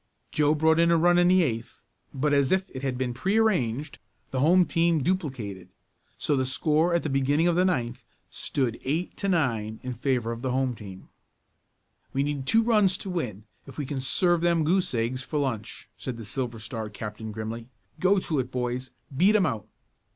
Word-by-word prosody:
Joe 150 0 +3
brought 160 +1 +3
in 170 0 +4
a 170 - +4
run 175 +2 +4
in 175 - +5
the 185 0 +5
eighth, 115 -6 -3 0.3
but 145 +2 0
as 140 -2 +3
if 190 0 +1
it 130 - -7
had 135 -2 -2
been 125 -1 -2
prearranged 155 - 0 0.3
the 130 - -1
home 175 +6 +5
team 165 -3 +1
duplicated 130 - -3 0.5
so 145 - 0
the 130 - +1
score 155 +6 +2
at 170 - +1
the - - -1
beginning 140 +4 +2
of 175 - +2
the 180 - +3
ninth 125 -11 -1 0.2
stood 125 -5 -2
eight 160 +7 -2
to 200 - -1
nine 115 - 0
in 125 0 -4
favor 120 -1 -1
of 115 0 -6
the 130 - -2
home 130 0 0
team. 100 -4 -11 1.0
"We 135 - +1
need 140 -2 -3
two 225 0 +4
runs 210 -5 +4
to 195 - -6
win, 120 - -3 0.2
if 135 - -12
we 145 - -2
can 135 -1 -3
serve 175 +6 +2
them 170 -2 +2
goose 180 +4 +1
eggs 120 +3 -1
for 150 - -4
lunch," 120 -7 -3
said 125 -3 -5
the 115 - -8
Silver 120 0 -4
Star 110 -1 -5
captain 105 +1 -7
grimly. 110 +2 -6 0.3
"Go 195 +2 +4
to 155 -5 -1
it, 125 -1 -2
boys; 125 +1 -3 0.3
beat 190 +9 +4
'em 200 -4 +4
out." 115 - -3
135 Hz, 195 wpm, -26 LUFS, 120-170 Hz, 1.0 s, in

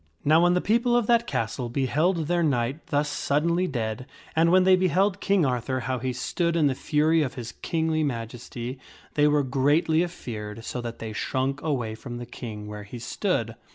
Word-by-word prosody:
/ - - -34
Now 155 +3 +5
when 175 +1 +4
the 180 - +2
people 235 +3 +2
of 240 -2 +3
that 235 +1 +3
castle 125 -3 -2
beheld 150 +7 +1
their 175 +2 +1
knight 135 -1 0
thus 145 0 +1
suddenly 165 +5 +1
dead, 115 -3 -3 0.3
and 165 +1 +4
when 185 +1 +6
they 185 0 +6
beheld 185 +2 +2
King 195 -5 +3
Arthur 130 0 -1
how 130 +1 -2
he 130 +2 -2
stood 170 +7 -1
in 160 -3 +3
the 140 - +3
fury 155 +4 +2
of 135 -4 -2
his 120 -2 -6
kingly 160 -2 0
majesty, 120 0 -5 0.3
they 150 0 +4
were 150 -1 +3
greatly 145 +5 +2
afeared 115 -10 -6
so 125 - -4
that 120 -1 -6
they 110 -1 -6
shrunk 135 +5 -1
away 125 -8 -1
from 120 +2 -7
the 120 - -6
King 110 -3 -7
where 105 0 -7
he 105 +4 -9
stood. 115 - -1
145 Hz, 195 wpm, -26 LUFS, 120-170 Hz, 0.3 s, when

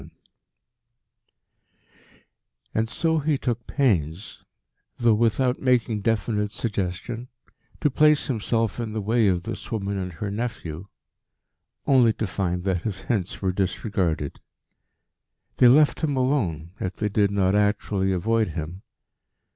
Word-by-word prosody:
VII - - -13 2.6
And 110 +1 0
so 160 +5 +1
he 150 -1 +1
took 120 -3 -3
pains, 95 - 0 0.5
though 120 -2 +4
without 120 +3 +1
making 120 -5 +2
definite 105 -1 0
suggestion, 110 +2 -3 0.5
to 150 - +2
place 150 +2 +4
himself 115 -2 -1
in 115 -2 -3
the 110 - -2
way 110 +2 +2
of 90 -2 +1
this - - -6
woman 100 -3 -2
and 90 -1 -4
her 100 +5 -4
nephew 100 -6 -5 1.0
only 125 -5 +5
to 110 - -3
find 90 -2 -2
that 95 -3 0
his 100 -2 -4
hints 100 -5 -2
were 95 - +2
disregarded. 90 -5 -1 1.2
They 125 - +7
left 145 +4 +5
him 145 -4 0
alone, 100 - 0
if 95 - -3
they 105 - -1
did 100 0 +2
not 95 -1 +1
actually 105 -2 +1
avoid 110 +4 +1
him. 85 +2 -6
105 Hz, 130 wpm, -24 LUFS, 95-120 Hz, 2.6 s, They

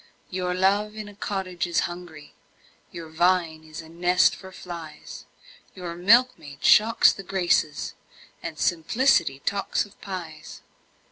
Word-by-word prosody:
Your 180 -1 -2
love 200 +3 +1
in 215 -1 -7
a 205 - -11
cottage 190 -3 -3
is 170 - +1
hungry, 175 -4 -7 0.6
Your 165 -1 -8
vine 165 -1 +1
is 155 +1 -9
a - - -14
nest 175 +2 +2
for 190 -1 -12
flies 170 -4 -9 0.5
Your 180 -3 -6
milkmaid 185 - +2
shocks 225 +2 +6
the - - -8
Graces, 175 -6 0 0.5
And 155 - -6
simplicity 170 - +2
talks 200 +1 0
of 205 - -20
pies! 170 -6 -8
180 Hz, 130 wpm, -25 LUFS, 160-195 Hz, 0.6 s, shocks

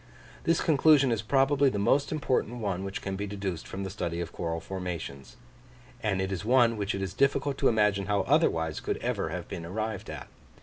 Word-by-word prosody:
This 165 0 +3
conclusion 145 -3 +5
is 115 -2 0
probably 135 +4 +3
the 105 - -3
most 140 +8 +2
important 130 -6 0
one 100 -5 -2
which 95 0 -5
can 95 -1 -3
be 100 +1 -3
deduced 100 -4 -4
from 95 +1 -5
the 95 - -4
study 85 -2 -3
of 85 -1 -4
coral 85 -1 -3
formations; 85 -5 -6 0.7
and 100 -3 0
it 95 0 -1
is 95 -1 -3
one 120 0 +4
which 100 -1 -2
it 95 - -3
is 95 - -4
difficult 140 0 +1
to 135 - +4
imagine 105 -3 +2
how 100 -1 +2
otherwise 90 - +2
could - - -2
ever - - -2
have - - -5
been 85 - -6
arrived 110 +3 -4
at. - - -7
100 Hz, 205 wpm, -28 LUFS, 95-130 Hz, 0.7 s, conclusion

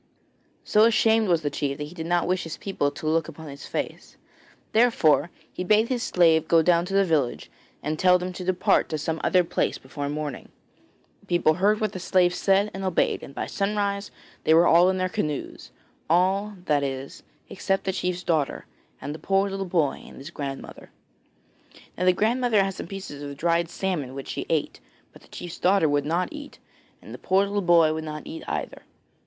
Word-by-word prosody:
So 215 +1 +4
ashamed 225 -1 +3
was 170 -3 +2
the 145 - -1
chief 140 -1 -2
that 150 - -4
he 150 +3 -9
did 165 -2 -6
not 175 0 +1
wish 185 0 0
his 165 - -6
people 190 -7 -1
to 150 - -10
look 160 0 +1
upon 160 -1 -10
his 140 0 -10
face, - - -5 0.5
therefore 180 -10 +3 0.2
he - - -4
bade 215 +4 +3
his 250 -2 -1
slave 165 -5 +3
go 165 -1 +4
down 170 0 +3
to 195 +2 -4
the 195 0 +4
village 145 - -1 0.3
and 155 +1 -2
tell 180 -1 +5
them 180 +1 -5
to 180 - -7
depart 185 0 +2
to 155 - -2
some 160 +2 -3
other 180 -1 +4
place 165 - -1
before 140 +2 -6
morning. 150 -2 -5 0.7
The - - -26
people 175 -3 +3
heard 205 +5 +2
what 215 -2 -1
the 185 - -6
slave 180 -1 +2
said 195 +3 +2
and 195 - -6
obeyed, 185 -3 +1
and 140 - -11
by - - -3
sunrise 200 0 -2 0.3
they 160 - +4
were 170 +1 +6
all 175 +2 +6
in 190 - 0
their 185 0 0
canoes 150 -5 -4 0.4
all, 190 +5 +2
that 145 -1 +2
is, 135 -1 -5 0.3
except 195 0 -1
the 190 - -1
chief's 180 0 -2
daughter, 155 -5 -1 0.3
and 145 +2 -5
the 155 - -9
poor 195 0 +1
little 195 0 -3
boy 165 -6 0
and - - -13
his 140 +5 -9
grandmother. 140 -4 -7 1.1
Now 180 - -2
the 185 - +5
grandmother 225 +1 +2
had 195 0 -2
some 180 - -7
pieces 190 -7 -8
of 140 -1 -7
dried 170 +1 +1
salmon 165 -10 -3
which 135 - -7
she - - -4
ate; - - -1 0.3
but - - -16
the - - -20
chief's 175 -2 -8
daughter 190 -2 +3
would 145 -1 +1
not 175 +3 0
eat, 295 -1 -9 0.5
and - - -11
the - - -9
poor 190 +2 +2
little 200 0 -1
boy 170 -3 +4
would 160 0 -4
not 155 -1 -7
eat 320 +2 -7
either. - - -4
175 Hz, 205 wpm, -25 LUFS, 155-195 Hz, 1.1 s, were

